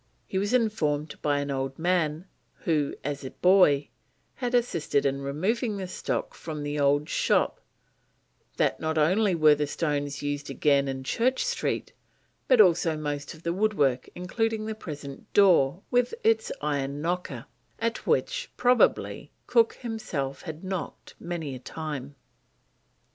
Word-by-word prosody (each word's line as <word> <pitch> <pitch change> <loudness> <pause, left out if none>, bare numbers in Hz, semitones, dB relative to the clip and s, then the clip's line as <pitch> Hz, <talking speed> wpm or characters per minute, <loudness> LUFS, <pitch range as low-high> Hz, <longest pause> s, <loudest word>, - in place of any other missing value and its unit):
He 190 - -2
was 205 +1 -1
informed 160 -12 0
by 145 -1 +1
an 145 0 -3
old 135 0 -3
man, 165 -1 0 0.4
who, 150 -4 0
as 145 0 -3
a 130 - -5
boy, 180 -6 +4 0.5
had 245 -1 -1
assisted 170 - +1
in 140 0 0
removing 200 - -1
the 190 -2 -4
stock - - -3
from 155 -2 -6
the 145 0 -2
old 145 +1 +3
shop, - - +1 1.0
that - - +1
not 160 0 -1
only 185 +5 +3
were 155 -2 +6
the 150 0 -1
stones 145 -2 -2
used 145 0 -3
again 140 0 +2
in 135 0 -4
Church 255 - +1
Street, 485 -1 -2 0.5
but 255 -3 +5
also 170 -5 +5
most 145 0 -4
of 160 - -17
the 170 - 0
woodwork, 160 -11 +1
including 220 +4 -1
the 220 - -3
present 145 -9 -9
door 180 -4 +4
with 245 - +2
its 450 0 +2
iron 140 -1 -1
knocker, 165 -7 -3 0.3
at 230 0 -2
which, - - 0
probably, 245 0 +2
Cook 230 -2 +3
himself 180 - -4
had 160 -1 -8
knocked 185 -1 -5
many 170 -5 -4
a 130 - -7
time. 145 -1 -6
160 Hz, 145 wpm, -27 LUFS, 145-205 Hz, 1.0 s, were